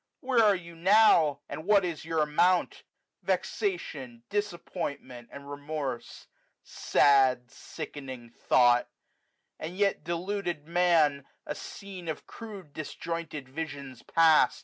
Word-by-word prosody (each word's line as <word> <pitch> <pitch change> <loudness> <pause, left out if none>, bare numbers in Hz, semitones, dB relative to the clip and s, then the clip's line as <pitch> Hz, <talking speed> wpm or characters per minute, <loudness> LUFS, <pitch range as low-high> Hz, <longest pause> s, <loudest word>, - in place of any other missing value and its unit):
2 - - -21
to - - -14
Where 240 -3 +5
are 205 -2 +5
you 170 -2 -9
now? 170 -5 +5
and 150 +2 -6
what 200 0 +4
is 165 -4 -4
your 160 -1 +1
amount? 170 +4 +2 0.4
Vexation, 135 - -3
disappointment, 170 - -4
and 140 0 -10
remorse. 145 -3 -5 0.4
Sad, 130 -3 +3
sickening 135 -5 -8 0.2
thought! 120 -1 +5 0.7
and 170 +4 -6
yet 200 -5 +1
deluded 175 -2 -3
Man, 165 -5 +3 0.2
A - - -3
scene 190 -3 -9
of 160 - -5
crude 200 -9 -10
disjointed 155 -2 -5
visions 140 -3 -7
past. 160 -5 +4
160 Hz, 120 wpm, -29 LUFS, 140-180 Hz, 0.7 s, Where